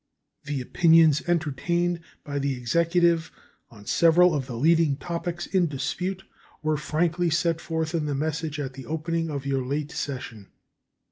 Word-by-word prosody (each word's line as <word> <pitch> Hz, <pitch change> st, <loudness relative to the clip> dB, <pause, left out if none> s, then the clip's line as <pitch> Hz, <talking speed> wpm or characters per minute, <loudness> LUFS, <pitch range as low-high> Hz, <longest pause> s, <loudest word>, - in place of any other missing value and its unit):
The 140 Hz, -2 st, -2 dB
opinions 160 Hz, +2 st, +4 dB
entertained 170 Hz, +2 st, 0 dB, 0.2 s
by 145 Hz, -1 st, -3 dB
the 140 Hz, -1 st, -1 dB
Executive 170 Hz, +5 st, +2 dB, 0.4 s
on 105 Hz, -3 st, -15 dB
several 170 Hz, -, +5 dB
of 135 Hz, -4 st, -2 dB
the 125 Hz, -, -6 dB
leading 160 Hz, +1 st, +3 dB
topics 175 Hz, +1 st, -4 dB
in 185 Hz, -3 st, +1 dB
dispute 180 Hz, +7 st, -3 dB, 0.4 s
were 155 Hz, 0 st, +1 dB
frankly 165 Hz, +3 st, 0 dB
set 165 Hz, 0 st, +1 dB
forth 160 Hz, 0 st, -2 dB
in 160 Hz, -3 st, -1 dB
the 145 Hz, -, -1 dB
message 155 Hz, +1 st, -2 dB
at 135 Hz, -2 st, -4 dB
the 135 Hz, 0 st, -10 dB
opening 165 Hz, +1 st, -2 dB
of 140 Hz, -2 st, -4 dB
your 135 Hz, -1 st, 0 dB
late 145 Hz, +4 st, -3 dB
session. 120 Hz, -7 st, -5 dB
160 Hz, 150 wpm, -25 LUFS, 140-170 Hz, 0.4 s, several